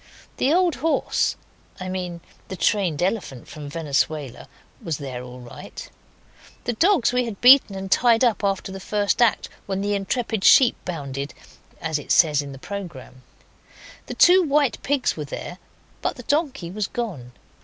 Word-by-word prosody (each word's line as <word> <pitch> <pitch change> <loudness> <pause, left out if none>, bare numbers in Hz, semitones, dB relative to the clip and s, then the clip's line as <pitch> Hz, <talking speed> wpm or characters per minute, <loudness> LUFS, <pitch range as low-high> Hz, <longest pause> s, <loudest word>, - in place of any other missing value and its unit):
The 270 - +2
old 350 -1 +2
horse 320 +3 0 0.4
I 185 - -5
mean 180 -2 -4 0.3
the 190 - -6
trained 175 -3 +1
elephant 180 - -3
from 150 -2 -9
Venezuela 150 -3 -2 0.3
was 160 -4 -3
there 130 -4 -6
all 125 0 -10
right 120 -1 -11
enough. - - -17
The 240 - -1
dogs 325 - +3
we 250 0 +1
had 220 -4 -6
beaten 250 -5 +7
and 190 0 -6
tied 235 -1 +4
up 235 -4 +2
after 195 -1 -1
the 195 - -7
first 205 +3 0
act, 235 -3 +3 0.2
when 195 -1 -2
the 205 +1 -1
intrepid 210 +1 -2
sheep 255 -3 +6
bounded, 140 -5 -5 0.4
as 160 -2 -2
it - - -7
says 150 -4 +4
in 140 -1 -8
the 135 - -9
programme. 170 -7 -8 0.9
The - - -6
two 365 +2 +6
white 295 -4 +1
pigs 280 -2 0
were 150 - -5
there, 175 +5 -7 0.4
but - - -1
the 245 - -10
donkey 275 - -1
was 205 +1 -2
gone. 165 - -5
195 Hz, 165 wpm, -23 LUFS, 150-240 Hz, 0.9 s, beaten